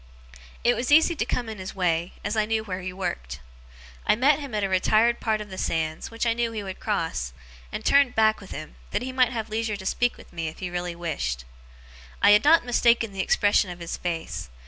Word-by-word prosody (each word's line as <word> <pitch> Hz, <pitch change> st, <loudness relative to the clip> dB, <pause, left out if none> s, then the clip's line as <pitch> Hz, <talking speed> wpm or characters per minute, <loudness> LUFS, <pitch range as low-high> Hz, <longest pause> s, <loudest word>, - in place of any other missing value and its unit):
It 240 Hz, -, +4 dB
was 250 Hz, +3 st, -2 dB
easy 320 Hz, +3 st, +6 dB
to 225 Hz, -, -1 dB
come 245 Hz, -1 st, -2 dB
in 220 Hz, -2 st, -6 dB
his 185 Hz, 0 st, -7 dB
way, 175 Hz, -2 st, 0 dB
as 215 Hz, -, -1 dB
I 215 Hz, -1 st, +1 dB
knew 220 Hz, 0 st, 0 dB
where 190 Hz, -3 st, -5 dB
he 185 Hz, +1 st, -4 dB
worked. 65 Hz, -, -4 dB, 0.6 s
I -, -, +3 dB
met 275 Hz, +5 st, +4 dB
him 280 Hz, -6 st, -6 dB
at 210 Hz, -, 0 dB
a -, -, +2 dB
retired 215 Hz, +5 st, +3 dB
part 215 Hz, -1 st, 0 dB
of 205 Hz, -2 st, -9 dB
the 190 Hz, -, -6 dB
sands, 160 Hz, -1 st, -2 dB
which 230 Hz, +1 st, -3 dB
I 230 Hz, -, +3 dB
knew 235 Hz, 0 st, -1 dB
he 215 Hz, -2 st, -4 dB
would 190 Hz, -1 st, -7 dB
cross, 165 Hz, -, -2 dB, 0.4 s
and -, -, -5 dB
turned 280 Hz, -2 st, +4 dB
back 220 Hz, -1 st, +3 dB
with 195 Hz, -, -12 dB
him, -, -, -8 dB
that -, -, -2 dB
he 260 Hz, -, -4 dB
might 255 Hz, -2 st, +3 dB
have 225 Hz, -3 st, -4 dB
leisure 220 Hz, 0 st, -1 dB
to 190 Hz, -, -10 dB
speak 245 Hz, +5 st, +1 dB
to -, -, -13 dB
me 165 Hz, -1 st, -3 dB
if 155 Hz, -, -7 dB
he 180 Hz, -2 st, -5 dB
really 175 Hz, -1 st, -3 dB
wished. 65 Hz, -, -3 dB, 0.7 s
I 205 Hz, -, +6 dB
had 210 Hz, 0 st, +6 dB
not 315 Hz, -3 st, +5 dB
mistaken 235 Hz, -2 st, +3 dB
the 195 Hz, -, -9 dB
expression 205 Hz, +1 st, +3 dB
of 175 Hz, -, -7 dB
his 170 Hz, -1 st, -5 dB
face. 165 Hz, -, -4 dB
210 Hz, 235 wpm, -25 LUFS, 175-235 Hz, 0.7 s, easy